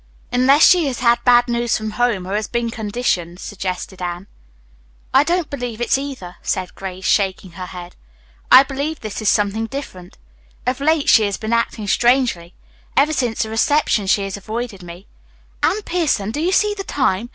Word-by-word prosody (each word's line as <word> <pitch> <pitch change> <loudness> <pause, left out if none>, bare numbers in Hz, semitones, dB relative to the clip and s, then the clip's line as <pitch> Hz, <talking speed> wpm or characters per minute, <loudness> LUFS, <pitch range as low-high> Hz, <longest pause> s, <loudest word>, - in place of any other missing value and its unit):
"Unless 270 +5 +5
she 350 -5 +5
has 255 -3 -4
had 235 -1 +3
bad 245 0 +5
news 240 -1 0
from 215 0 -4
home 235 -6 0
or 190 - -5
has 215 0 -1
been 235 -1 -2
conditioned," 205 -6 -2
suggested 190 -2 -5
Anne. 175 +1 -4 0.9
"I 270 +2 +6
don't 340 +1 0
believe 245 -5 -5
it's 240 - +1
either," 265 -10 -6
said 185 -1 -3
Grace, 190 -1 -7
shaking 190 -2 0
her 180 +2 -8
head. 180 -1 -10 0.6
"I 265 - +10
believe 280 +3 -4
this 215 0 -5
is 215 - +2
something 210 +2 +1
different. 205 -10 -8 0.5
Of 250 +1 -1
late 310 0 +2
she 220 - +6
has 200 -1 -2
been 220 +1 -3
acting 230 -2 -1
strangely. 235 -7 +1 0.4
Ever 295 +3 +4
since 245 -6 0
the 220 - -6
reception 230 -3 +1
she 200 +1 +2
has 195 0 -4
avoided 215 0 -5
me. 175 +2 -11 0.6
Anne 425 +2 +1
Pierson, 300 - 0
do 295 - -3
you 350 +3 +1
see 415 +2 +2
the 395 -1 -6
time? 240 - -1
230 Hz, 180 wpm, -19 LUFS, 195-270 Hz, 0.9 s, I